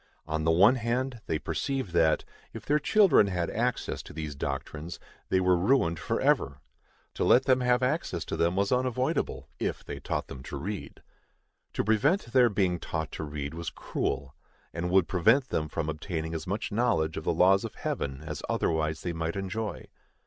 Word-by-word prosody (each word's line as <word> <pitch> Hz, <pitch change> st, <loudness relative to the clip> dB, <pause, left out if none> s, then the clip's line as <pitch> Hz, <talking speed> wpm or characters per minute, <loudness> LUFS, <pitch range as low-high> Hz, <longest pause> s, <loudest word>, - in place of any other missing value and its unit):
On 80 Hz, 0 st, -2 dB
the -, -, +3 dB
one 100 Hz, +10 st, +6 dB
hand, 120 Hz, +1 st, -2 dB
they 80 Hz, -, 0 dB
perceive 135 Hz, -, -3 dB
that, 80 Hz, -2 st, +3 dB, 0.3 s
if -, -, -8 dB
their 150 Hz, +1 st, +3 dB
children 175 Hz, -, +5 dB
had 90 Hz, -3 st, -1 dB
access 120 Hz, +2 st, -1 dB
to -, -, -12 dB
these 75 Hz, -1 st, -5 dB
doctrines, 70 Hz, +4 st, -5 dB, 0.3 s
they 95 Hz, -, +3 dB
were 90 Hz, 0 st, +4 dB
ruined 85 Hz, -4 st, +2 dB
forever. 70 Hz, -2 st, +1 dB, 0.5 s
To -, -, -2 dB
let 125 Hz, -, +5 dB
them 130 Hz, -1 st, +3 dB
have 125 Hz, 0 st, +2 dB
access 125 Hz, -, -1 dB
to -, -, -3 dB
them 85 Hz, +2 st, +1 dB
was 100 Hz, +1 st, +1 dB
unavoidable, 125 Hz, 0 st, 0 dB
if -, -, -3 dB
they -, -, -6 dB
taught -, -, -2 dB
them 65 Hz, -, -9 dB
to 65 Hz, -, -6 dB
read. 100 Hz, +7 st, -6 dB, 0.7 s
To -, -, 0 dB
prevent 120 Hz, -, +2 dB
their 125 Hz, -2 st, +6 dB
being 95 Hz, -4 st, +1 dB
taught 80 Hz, -3 st, -4 dB
to -, -, -5 dB
read 75 Hz, -1 st, -5 dB
was 85 Hz, 0 st, -4 dB
cruel, 70 Hz, -2 st, -3 dB, 0.4 s
and 90 Hz, +1 st, -2 dB
would 95 Hz, -1 st, +4 dB
prevent 115 Hz, +9 st, +3 dB
them 75 Hz, -1 st, -1 dB
from 75 Hz, -, -3 dB
obtaining 80 Hz, +1 st, -3 dB
as 80 Hz, +1 st, -5 dB
much 100 Hz, +4 st, -2 dB
knowledge 100 Hz, -9 st, +1 dB
of -, -, -4 dB
the -, -, +2 dB
laws 95 Hz, +2 st, +4 dB
of -, -, -6 dB
Heaven 70 Hz, +1 st, -3 dB
as 75 Hz, -2 st, -5 dB
otherwise 80 Hz, -1 st, 0 dB
they 85 Hz, -, -3 dB
might 80 Hz, 0 st, -3 dB
enjoy. 100 Hz, +3 st, -4 dB
90 Hz, 185 wpm, -28 LUFS, 80-120 Hz, 0.7 s, one